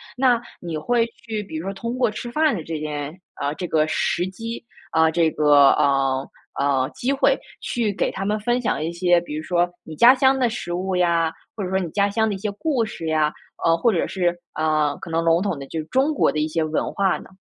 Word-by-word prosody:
那 250 -2 +3 0.2
你 170 -3 -4
会 235 +10 +1
去 220 -2 -6
比 195 -6 -9
如 160 - -5
说 195 - -3
通 230 +5 -4
过 245 -4 +2
吃 240 +3 -6
饭 305 +2 +2
的 170 - -5
这 160 0 -4
件 150 +2 -5
啊， 140 0 -2
这 180 - -4
个 155 -1 +2
时 175 +2 0
机， 230 +6 -6 0.3
啊， 160 0 +4
这 160 0 +2
个， 145 -2 +6
呃 135 -1 +1 0.3
呃， 135 -2 +2
机 255 - -1
会 275 - +3 0.2
去 230 -3 -1
给 200 - -1
他 195 - -5
们 210 +2 0
分 240 +4 0
享 185 - -1
一 165 - -2
些， 175 0 +3
比 170 - -8
如 155 - -3
说 175 +2 +1 0.2
你 160 - -9
家 240 +9 +8
乡 265 0 +3
的 255 -2 +2
食 220 -6 -4
物 185 +1 -2
呀， 170 -2 +2 0.2
或 210 - -4
者 180 - -3
说 190 - +2
你 180 -3 -3
家 200 +4 +1
乡 220 +2 +1
的 205 - -2
一 - - -5
些 210 +2 -3
故 260 +3 0
事 215 -6 -6
呀， 155 -1 +2 0.3
呃， 165 0 +4
或 230 +6 +2
者 170 - 0
是， 175 -2 0 0.2
呃， 155 -2 +1
可 165 - -8
能 165 0 +1
笼 165 0 +4
统 190 -8 -2
的 135 - -8
就 160 - -4
是 155 - -5
中 265 - +1
国 - - +3
的 155 - -2
一 155 - +1
些 160 +1 -1
文 155 0 -1
化 195 -1 +1
呢？ - - -14
175 Hz, 260 characters per minute, -22 LUFS, 155-220 Hz, 0.3 s, 家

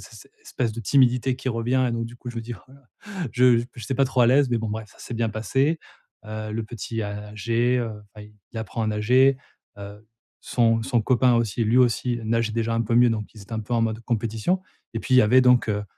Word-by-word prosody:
s - - -13
s - - -26
espèce 125 - -3
de 115 - -6
timidité 125 +1 +2
qui 130 0 -4
revient 125 +3 0
et 120 - -2
donc 115 0 -2
du 120 - -12
coup, 120 0 -8
je 120 - -11
me 115 - -2
dis: 120 +1 -6
«Oh 95 - -15
la 130 - -17
la», 140 -3 -25 0.3
je 125 -1 +5
j 120 - -2
p - - -36
je 110 - -7
suis 135 - -2
pas 135 - +3
trop 130 -1 0
à 120 - +5
l'aise 135 +1 +4
mais 120 - +1
bon 110 0 -3
bref, 110 0 -5
ça - - -22
s'est 120 - -7
bien 115 -1 -1
passé, 135 +9 0 0.5
heu. 110 0 -6
Le 115 +1 -2
petit 115 0 -5
a 105 0 -6
agé, 115 +4 0
heu, 115 -2 -2 0.2
enfin 105 -1 -11 0.3
il 115 - -5
apprend 110 +1 -4
à - - 0
nager, 125 +6 +3 0.4
heu, 100 +2 -10 0.3
son 115 -2 +1
son 120 0 +1
copain 125 +1 +3
aussi, 115 -1 0
lui 115 +4 +3
aussi 120 -1 +1
nage 115 0 0
déjà 115 0 -1
un 115 - +1
peu 115 +1 -1
mieux 120 0 +6
donc 110 -2 -4
ils 105 - -12
étaient 100 - -13
un 110 - -2
peu 110 +3 -8
en 115 - +2
mode 110 0 -1
compétition 115 - -1 0.3
et 115 - -2
puis 130 - 0
il - - +7
y - - +7
avait 125 +5 +5
donc, 125 -2 +4
heu, 105 0 -2
115 Hz, 265 wpm, -24 LUFS, 110-125 Hz, 0.5 s, il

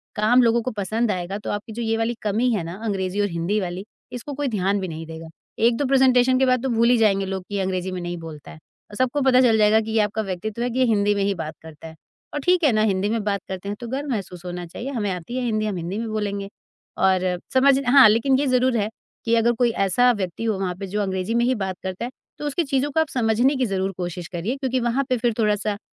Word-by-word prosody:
काम 225 +4 +4
लोगों 235 0 +3
को 255 - -3
पसंद 220 +3 0
आएगा 185 +2 -3
तो - - -6
आपकी 205 +2 -5
जो 235 - -5
ये 225 0 0
वाली 225 +1 0
कमी 220 +4 +1
है 200 -6 -1
ना, 170 +1 -6
अंग्रेज़ी 195 -1 -1
और 205 - +2
हिंदी 170 +5 -1
वाली, 180 +2 -5 0.3
इसको 250 +4 -6
कोई 285 0 -2
ध्यान 195 +2 +1
भी 185 - -3
नहीं 160 0 -6
देगा। 160 0 -9 0.3
1-2 235 +5 +2
प्रेज़ेंटेशन 255 -1 +4
के 265 - +4
बाद 255 -1 +2
तो 265 - 0
भूल 235 0 +3
ही 245 - +5
जाएँगे 195 -3 +3
लोग 190 -1 -4
कि 205 - -4
ये 195 - 0
अंग्रेज़ी 185 0 -2
में 185 -1 -4
नहीं 175 0 -4
बोलता 160 -3 -10
है - - -11
औ - - -18 0.4
सबको 255 +3 +1
पता 260 -1 +5
चल 230 -3 +4
जाएगा 215 +1 +5
कि 220 - -5
ये 220 - +2
आपका 210 +1 -1
व्यक्तित्व 205 +4 -4
है 245 - 0
कि 250 - -3
ये 255 - +5
हिंदी 205 -2 +2
में 200 - 0
ही 200 0 +1
बात 155 0 -5
करता 160 0 -11
है 160 - -12 0.4
और 295 - -2
ठीक 360 -1 +3
है 290 - +5
ना, 215 -1 +2
हिंदी 200 -1 +1
में 225 -2 -1
बात 200 -2 -1
करते 190 +1 -6
हैं 205 - -3
तो 240 - -7
गर्व 275 +4 -3
महसूस 180 -5 -5
होना 175 0 -5
चाहिए। 230 +10 -7
हमें 215 -7 -2
आती 180 +7 -6
है 255 - -1
हिंदी, 215 -2 0
हम 210 -2 -2
हिंदी 175 +4 -4
में 230 0 -3
बोलेंगे 200 -2 -3 0.5
और 190 -1 +3 0.3
समझ 265 +1 +5
हाँ, 265 -2 +8
लेकिन 230 +5 +3
ये 285 - +1
ज़रूर 255 -1 +2
है 210 -1 0 0.4
कि 230 0 +3
अगर 230 +1 +3
कोई 240 -2 +3 0.2
ऐसा 245 +7 +4
व्यक्ति 195 -1 -4
हो 220 -4 0
वहाँ 185 -2 -1
पे 195 - -5
जो 210 +3 -2
अंग्रेज़ी 190 +2 -2
में 235 0 +3
ही 255 0 +2
बात 190 -3 -3
करता 190 +5 -4
है, 250 - -6 0.3
तो 295 - -6
उसकी 290 +4 0
चीज़ों 275 0 0
को 320 - +1
आप 320 - +2
समझने 240 +3 +2
की 260 - +1
ज़रूर 195 -2 -1
कोशिश 175 -1 -5
करिए 185 +9 -3
क्योंकि 260 -2 -1
वहाँ 240 +3 0
पे 255 - +2
फिर 235 -1 0
थोड़ा-सा 210 -1 +1
215 Hz, 270 wpm, -23 LUFS, 190-245 Hz, 0.5 s, हाँ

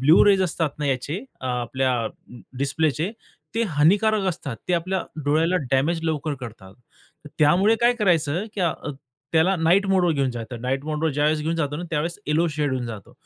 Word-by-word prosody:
Blue 150 +6 +6
rays 195 -2 +5
असतात 165 -3 0
ना 150 - -1
याचे 140 +4 -1 0.2
अ, 130 - -5
आपल्या 125 +1 0 0.7
डिस्प्लेचे 155 +5 0 0.4
ते 230 - +1
हानिकारक 205 +8 +4
असतात. 140 -8 -4
ते - - +1
आपल्या 185 +2 -1 0.2
डोळ्याला 160 +5 +2 0.2
डॅमेज 155 +6 +2
लवकर 155 -2 -1
करतात. 105 -6 -10 0.6
त्यामुळे 185 +9 +4
काय 240 +1 +5
करायचं 170 -2 +2
की - - -1 0.7
त्याला 165 +4 +4
नाईट 175 +5 +3
मोडवर 185 -3 +3
घेऊन 140 -3 0
जातो. 120 0 -6
नाईट 130 +4 -2
मोडवर 155 +1 -1
ज्यावेळेस 150 +2 +1
घेऊन 165 +2 -1
जातो 150 +1 -2
त्यावेळेस 165 +2 -2
येलो 160 +3 +2
शेड 145 -3 0
होऊन 125 -2 -2
जातो. 110 -4 -8
155 Hz, 165 wpm, -23 LUFS, 135-175 Hz, 0.7 s, Blue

